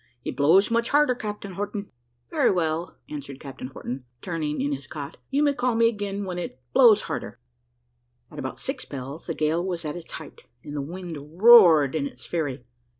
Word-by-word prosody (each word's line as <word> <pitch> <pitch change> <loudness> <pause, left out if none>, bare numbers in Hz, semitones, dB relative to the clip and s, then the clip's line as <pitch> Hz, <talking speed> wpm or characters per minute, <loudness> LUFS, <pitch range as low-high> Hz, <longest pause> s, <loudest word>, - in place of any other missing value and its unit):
"It - - -3
blows 170 +10 +4
much 235 0 +1
harder, 295 -2 +4
Captain 210 -4 -6
Horton." 205 +1 -4 0.4
"Very - - +3
well," 165 -1 -1
answered 140 -2 -7
Captain 135 -2 -8
Horton, 130 -1 -6
turning 155 -2 -3
in 145 - 0
his 135 0 -6
cot; 145 -1 -7
"you 285 +2 +2
may 290 -1 +3
call 245 -2 0
me 230 0 +5
again 205 -2 -4
when 180 -1 -4
it 150 -7 -6
blows 230 -6 +7
harder." - - -5 0.9
At - - -9
about 130 - -5
six 265 -1 -4
bells 140 +3 -7
the 165 - -2
gale 155 +3 +1
was 175 -3 -3
at 150 - -3
its 175 -2 -9
height, 160 - -10 0.2
and 145 - -7
the 145 - -1
wind 165 0 -8
roared 175 - +8
in 145 -3 0
its - - -13
fury. 145 -7 -3
170 Hz, 190 wpm, -25 LUFS, 145-205 Hz, 0.9 s, roared